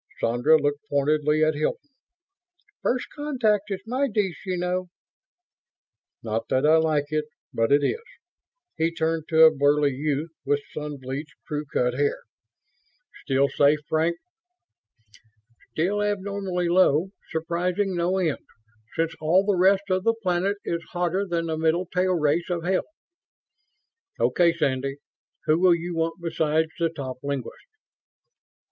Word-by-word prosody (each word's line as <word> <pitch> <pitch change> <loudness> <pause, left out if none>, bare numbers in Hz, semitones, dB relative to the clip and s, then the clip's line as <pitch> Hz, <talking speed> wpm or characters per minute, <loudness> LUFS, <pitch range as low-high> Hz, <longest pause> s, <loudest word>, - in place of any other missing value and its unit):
Sandra 120 +7 +4
looked 145 0 0
pointedly 150 +2 +2
at 155 0 +3
Hilton. 155 - -3 0.9
"First 250 0 0
contact 245 -9 0
is 195 -1 -4
my 260 +5 0
dish, 205 -7 -1
you 185 -1 -1
know." 180 +1 -1 1.4
"Not 110 0 -2
that 130 +2 +2
I 155 +1 +6
like 155 -2 +1
it, 155 0 0 0.3
but 115 +3 +1
it 145 +1 +5
is." 460 - 0 0.8
He 165 +1 +1
turned 160 -1 -1
to 160 0 +5
a 160 -1 +7
burly 145 +1 +3
youth 150 +3 -2
with 145 0 0
sun 150 -1 -5
bleached, 135 +5 -6
crew 150 -1 -3
cut 125 0 +1
hair, 145 +3 0 1.0
"Still 135 0 +2
safe, 145 +2 +3
Frank?" 160 +2 +1 1.6
"Still 195 +6 0
abnormally 200 -3 -2
low. 175 0 +3 0.2
Surprising 175 +4 -1
no 175 +2 +1
end, 165 -6 -1 0.5
since 165 0 0
all 175 +5 +3
the 205 -1 +2
rest 190 +2 +4
of 185 0 +1
the 230 +1 +2
planet 185 +2 +1
is 170 0 -2
hotter 180 +3 0
than 170 -2 -1
the 160 -1 -2
middle 165 +3 +1
tail 180 +1 0
race 160 +2 +1
of 175 -2 -2
hell." 185 +1 0 1.3
"Okay, 175 -1 +3
Sandy. 135 -4 -1 0.5
Who 155 +2 +3
will 180 -1 +5
you 170 +1 -5
want 165 0 -1
besides 160 -1 0
the 165 -1 +2
top 135 -5 -6
linguists?" 140 -4 -5
165 Hz, 140 wpm, -25 LUFS, 150-185 Hz, 1.6 s, a